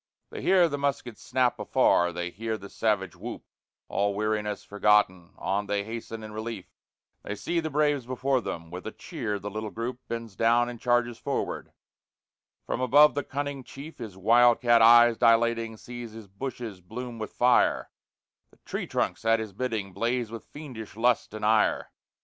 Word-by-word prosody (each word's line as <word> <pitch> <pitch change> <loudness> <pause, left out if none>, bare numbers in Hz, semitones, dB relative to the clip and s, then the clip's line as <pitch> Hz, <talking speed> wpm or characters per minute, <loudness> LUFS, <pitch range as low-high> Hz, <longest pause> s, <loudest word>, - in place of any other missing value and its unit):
They - - -6
hear 185 -2 +5
the 145 -3 -3
muskets 140 -5 -2
snap 125 0 +1
afar, 85 0 +3
they 90 +1 -4
hear 110 +3 -3
the 100 -1 -11
savage 105 -4 0
whoop - - -7 0.4
All 100 0 0
weariness 105 0 -1
forgotten, 105 -4 +2
on 100 +1 -1
they 100 0 0
hasten 115 0 -7
in 110 - -8
relief; 110 -3 -5 0.6
They 105 - -5
see 170 +10 -1
the 160 -1 -2
braves 145 -3 +1
before 130 +1 0
them 85 -5 -6
with 90 +3 -7
a - - -4
cheer 115 - -4
the 100 +1 -6
little 110 +1 -4
group 115 +5 -5
Bends 115 -3 -5
down 120 +2 +3
and 120 -2 -9
charges 120 -1 +1
forward; - - -3 0.9
from 125 - -2
above 145 +4 +6
the 145 - -2
cunning 140 0 -4
Chief, 140 +5 -11
His 110 -6 -8
wild 120 +4 +5
cat 120 -2 +4
eyes 120 0 +7
dilating, 115 -1 +3
sees 120 -1 -8
his 110 -1 -10
bushes 110 -1 -6
bloom 120 +5 -7
with 110 - -5
fire, 125 0 +3 0.6
The - - -25
tree - - -4
trunks - - -1
at 115 0 +3
his 110 -3 -6
bidding 110 -4 -3
blaze 120 0 -1
with 115 - -8
fiendish 130 -9 -9
lust 120 +1 +1
and 110 - -3
ire. 110 0 +2
115 Hz, 175 wpm, -27 LUFS, 105-125 Hz, 0.9 s, eyes